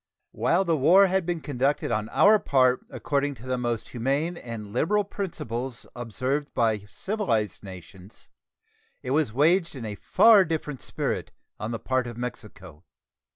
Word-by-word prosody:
While 185 +3 +1
the 165 -2 +2
war 170 +8 +6
had 190 -2 0
been 175 -2 -2
conducted 140 -1 -1
on 110 -1 -1
our 215 +1 +5
part 130 -6 +2
according 145 0 -1
to 125 - -13
the 130 0 -1
most 120 -2 -3
humane 140 +8 -1
and 115 -8 -8
liberal 205 - +2
principles 130 - -5
observed 130 +5 -3
by 110 -2 +2
civilized 115 - -2
nations, 95 +1 -12 0.8
it 130 - -4
was 150 -4 +1
waged 165 - +2
in 125 -4 -6
a 105 - -4
far 210 - +5
different 155 -5 -4
spirit - - -3 0.3
on 105 - -4
the 115 - -3
part 130 +1 -1
of 120 -1 -8
Mexico. 100 -9 -8
130 Hz, 155 wpm, -26 LUFS, 115-165 Hz, 0.8 s, war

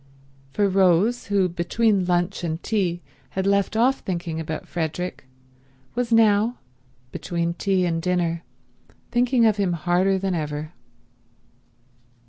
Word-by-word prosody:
For 200 +8 +2
Rose, 195 +5 +2
who 200 -2 +2
between 185 +3 +1
lunch 175 +1 0
and 165 0 -3
tea 180 -6 -1 0.3
had 190 - 0
left 200 +2 +1
off 255 +4 +3
thinking 170 -3 -4
about 155 -1 -5
Frederick, 175 -1 -4 0.7
was 240 0 -2
now, 225 +1 +4 0.5
between 170 +3 -2
tea 185 0 +1
and 165 -1 -1
dinner, 175 -2 0 0.7
thinking 245 0 +3
of 215 -2 +3
him 195 -3 +1
harder 180 +3 +1
than 190 0 -1
ever. 155 -1 -4
185 Hz, 120 wpm, -23 LUFS, 170-205 Hz, 0.7 s, now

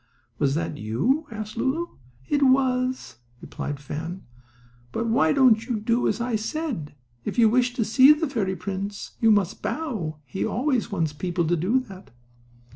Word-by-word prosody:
"Was 140 -1 +2
that 150 -2 -3
you?" 245 - 0
asked 215 -1 -6
Lulu. 275 +8 0 0.4
"It 290 - +1
was," 255 - +2 0.2
replied 145 +3 -5
Fan. 160 +6 -6 0.7
"But 230 - -2
why 160 -9 +3
don't 245 -5 +5
you 235 -4 -1
do 230 +3 +1
as - - 0
I 235 -1 -1
said? 220 - -3 0.3
If - - -4
you 230 -2 +6
wish 245 +2 +2
to 230 - 0
see 260 +6 +7
the 300 +2 +2
fairy 205 -8 -1
prince 200 +1 -5
you 225 - +5
must 205 -4 +2
bow. 215 - -3
He 165 +9 -4
always 255 -1 0
wants 165 -6 -1
people 175 +2 -1
to 175 +2 +2
do 190 +11 +2
that." 195 -7 -12
220 Hz, 165 wpm, -25 LUFS, 175-255 Hz, 0.7 s, see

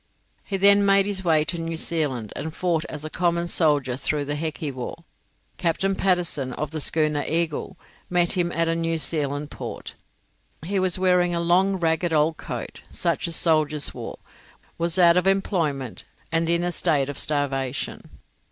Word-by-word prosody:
He 195 - -3
then 200 +1 +6
made 195 0 +4
his 200 -2 -2
way 160 -3 +3
to 170 +1 -2
New 165 0 -3
Zealand, 140 -10 -1
and 160 +1 -5
fought 170 -3 0
as 150 0 -7
a - - -4
common 170 0 0
soldier 145 -7 +1
through 145 +2 -1
the 145 - -2
Heki 155 -1 -3
war. 130 +6 -7 0.5
Captain 190 +3 0
Patterson, 175 -9 0
of 150 +2 -4
the 160 -1 -3
schooner 150 -1 +1
'Eagle', 165 -1 -1 0.3
met 175 -1 +3
him 175 -1 +1
at 165 0 0
a 165 - +1
New 165 0 -1
Zealand 145 -2 +1
port. - - -7 0.7
He 195 +2 0
was 185 -1 +1
wearing 180 -1 +2
a - - 0
long, 180 +3 +2
ragged 165 0 0
old 155 +1 +2
coat, - - -7
such - - -1
as 165 - 0
soldiers 155 -3 +3
wore, - - -7 0.6
was 170 +2 +1
out 170 -1 +6
of 180 - +2
employment, 165 - -1 0.3
and 165 0 0
in 170 0 +1
a 175 - -1
state 145 -4 +2
of 145 - -5
starvation. 140 -2 -2
165 Hz, 170 wpm, -24 LUFS, 150-175 Hz, 0.7 s, then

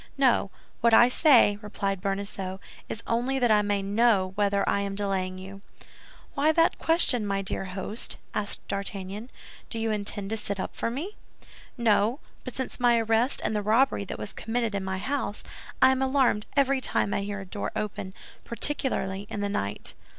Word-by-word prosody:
"No; 255 -7 +3 0.3
what 230 -1 +5
I 240 +2 +7
say," 250 -8 +5
replied 200 -2 -3
Bonacieux, 195 -1 -3 0.3
"is 225 - -5
only 245 +4 0
that 245 -3 +3
I 210 -1 +5
may 205 -1 0
know 200 -2 +2
whether 200 0 +1
I - - +2
am 200 0 -3
delaying 190 -2 -2
you." 195 +1 -10 0.7
"Why 295 +2 +3
that 330 +1 +3
question, 325 -8 +3
my 195 -1 -1
dear 195 - -1
host?" 190 +4 -4 0.2
asked 205 -1 +1
D'Artagnan. 200 +3 -5 0.4
"Do 230 - -3
you 225 0 -1
intend 205 -1 -2
to 225 - 0
sit 200 -2 -2
up - - -4
for - - -1
me?" 310 - -5 0.6
"No; 230 +2 +2 0.2
but 255 - -7
since 260 - -3
my 240 -1 +4
arrest 225 +3 +1
and 215 - 0
the 210 - 0
robbery 220 +2 +2
that - - -6
was 205 - -7
committed 230 -1 -2
in 200 -1 -2
my 190 0 -2
house, 255 0 -3 0.4
I 260 - +8
am 265 0 0
alarmed 265 -5 +2
every 275 -1 +3
time 200 - 0
I - - 0
hear 205 0 -4
a 195 - -7
door 200 +2 -4
open, 195 -2 -4 0.3
particularly 210 -6 -1
in 205 - -4
the 205 - -1
night. 105 - -3
210 Hz, 180 wpm, -27 LUFS, 195-245 Hz, 0.7 s, I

